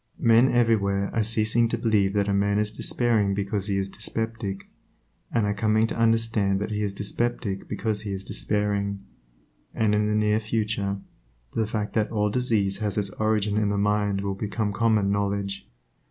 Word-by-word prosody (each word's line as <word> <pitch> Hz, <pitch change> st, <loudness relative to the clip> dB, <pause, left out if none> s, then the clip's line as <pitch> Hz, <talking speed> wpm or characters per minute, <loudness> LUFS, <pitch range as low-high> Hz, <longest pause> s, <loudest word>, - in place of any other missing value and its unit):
Men 115 Hz, +3 st, +5 dB
everywhere 100 Hz, -5 st, +2 dB
are 115 Hz, -, +2 dB
ceasing 110 Hz, +1 st, +2 dB
to 115 Hz, -, -2 dB
believe 105 Hz, -4 st, +2 dB
that 100 Hz, -1 st, +1 dB
a 100 Hz, -, +1 dB
man 100 Hz, +1 st, +2 dB
is 105 Hz, 0 st, 0 dB
despairing 110 Hz, -3 st, +1 dB
because 100 Hz, 0 st, -2 dB
he 100 Hz, -1 st, 0 dB
is 95 Hz, 0 st, -1 dB
dyspeptic, 110 Hz, -1 st, -4 dB, 0.6 s
and 115 Hz, -3 st, +1 dB
are 105 Hz, -, +1 dB
coming 110 Hz, +1 st, +2 dB
to -, -, -3 dB
understand 115 Hz, -4 st, +2 dB
that 105 Hz, -, -3 dB
he 105 Hz, 0 st, -1 dB
is 105 Hz, -1 st, -1 dB
dyspeptic 105 Hz, 0 st, -2 dB
because 110 Hz, -2 st, -2 dB
he 105 Hz, -2 st, -5 dB
is 95 Hz, 0 st, -5 dB
despairing, 100 Hz, -1 st, -1 dB, 0.7 s
and 110 Hz, -2 st, +2 dB
in 105 Hz, 0 st, +2 dB
the 105 Hz, -, +1 dB
near 105 Hz, 0 st, +2 dB
future, 105 Hz, -2 st, -1 dB, 0.6 s
the 110 Hz, -2 st, 0 dB
fact 105 Hz, -1 st, -3 dB
that 110 Hz, -1 st, +1 dB
all 105 Hz, -2 st, 0 dB
disease 105 Hz, -5 st, +1 dB
has 105 Hz, -2 st, -2 dB
its 100 Hz, -2 st, -1 dB
origin 105 Hz, -1 st, +1 dB
in 105 Hz, -1 st, +1 dB
the 100 Hz, -, 0 dB
mind 105 Hz, -1 st, +1 dB
will 100 Hz, 0 st, -2 dB
become 105 Hz, +1 st, -2 dB
common 110 Hz, -2 st, +2 dB
knowledge. 100 Hz, -6 st, -2 dB
105 Hz, 180 wpm, -25 LUFS, 100-110 Hz, 0.7 s, Men